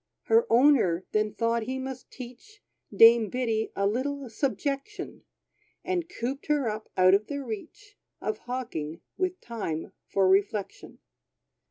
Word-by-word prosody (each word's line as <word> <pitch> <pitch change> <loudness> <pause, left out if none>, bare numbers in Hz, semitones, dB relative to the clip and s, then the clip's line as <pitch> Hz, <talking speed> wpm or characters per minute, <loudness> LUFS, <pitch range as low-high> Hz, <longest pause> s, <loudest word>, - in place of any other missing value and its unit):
Her 460 +1 +4
owner 230 - +4
then 215 0 0
thought 230 0 +1
he 260 +4 -3
must 265 -1 -6
teach 260 - -12 0.3
Dame 230 -2 +7
Biddy 225 -2 -1
a 200 - 0
little 260 +4 -2
subjection; 275 +2 -3 0.6
And 355 -2 -2
cooped 270 -3 -4
her 295 -4 +2
up, 215 0 -4
out 185 0 +6
of 205 +2 +3
the 285 -1 -4
reach 410 - -8 0.2
Of 425 - -3
hawking, 170 -11 -4
with 370 0 -1
time 200 -9 -4
for 195 -1 +2
reflection. 200 +1 0
240 Hz, 135 wpm, -28 LUFS, 215-280 Hz, 0.6 s, Dame